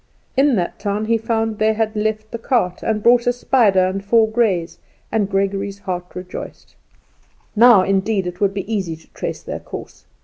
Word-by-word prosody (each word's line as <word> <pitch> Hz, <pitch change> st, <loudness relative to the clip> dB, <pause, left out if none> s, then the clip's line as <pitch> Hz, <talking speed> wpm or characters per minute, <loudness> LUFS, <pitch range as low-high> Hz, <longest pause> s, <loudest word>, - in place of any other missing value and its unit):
In 270 Hz, -1 st, +4 dB
that 175 Hz, -4 st, -2 dB
town 205 Hz, +1 st, -2 dB
he 230 Hz, +1 st, +2 dB
found 225 Hz, -1 st, -1 dB
they 220 Hz, 0 st, +3 dB
had 220 Hz, 0 st, -1 dB
left 215 Hz, 0 st, -2 dB
the 230 Hz, -, -5 dB
cart, 225 Hz, -7 st, 0 dB
and 215 Hz, -1 st, -1 dB
bought 240 Hz, 0 st, +4 dB
a -, -, +5 dB
spider 230 Hz, -6 st, +3 dB
and 190 Hz, +1 st, -3 dB
four 220 Hz, +2 st, +4 dB
greys, 190 Hz, -8 st, 0 dB, 0.3 s
and 210 Hz, -3 st, 0 dB
Gregory's 195 Hz, 0 st, -1 dB
heart 180 Hz, -3 st, -4 dB
rejoiced. 180 Hz, 0 st, -8 dB, 0.8 s
Now 225 Hz, -3 st, +7 dB
indeed 195 Hz, +1 st, 0 dB
it 180 Hz, +1 st, -6 dB
would 195 Hz, -1 st, +1 dB
be 205 Hz, +3 st, -4 dB
easy 185 Hz, -6 st, -2 dB
to 160 Hz, -, -20 dB
trace -, -, -5 dB
their -, -, -5 dB
course. -, -, -10 dB
210 Hz, 180 wpm, -20 LUFS, 190-225 Hz, 0.8 s, Now